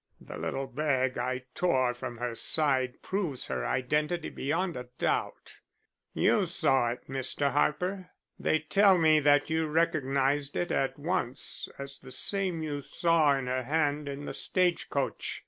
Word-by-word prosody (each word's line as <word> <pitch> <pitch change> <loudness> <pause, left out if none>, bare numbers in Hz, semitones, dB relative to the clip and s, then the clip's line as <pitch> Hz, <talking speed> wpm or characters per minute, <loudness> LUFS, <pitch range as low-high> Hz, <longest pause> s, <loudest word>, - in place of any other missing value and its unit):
The - - -10
little 135 - -3
bag 130 -2 0
I 125 +1 -2
tore 130 -8 +2
from 120 -1 -6
her 120 0 -3
side 130 -1 +1
proves 180 -10 -2
her 65 -2 -3
identity 150 +6 0
beyond 170 +5 -2
a 125 -1 -7
doubt. - - -2 0.6
You - - +3
saw 130 -3 +2
it, - - -14
Mr. 135 +1 0
Harper. 180 +7 0 0.3
They 155 - +2
tell 195 +4 +5
me 155 -2 +5
that 145 +1 +3
you 160 0 +1
recognized 145 -3 +1
it 175 - -1
at 135 - 0
once 140 -5 -3
as 140 0 -8
the 130 - -12
same 185 +3 -1
you 145 -2 -3
saw 155 -2 +2
in 135 - -3
her 130 +1 -1
hand 145 +1 0
in 140 +1 -6
the - - -5
stage 180 -2 0
coach. 140 -2 -2
145 Hz, 155 wpm, -29 LUFS, 130-160 Hz, 0.6 s, tell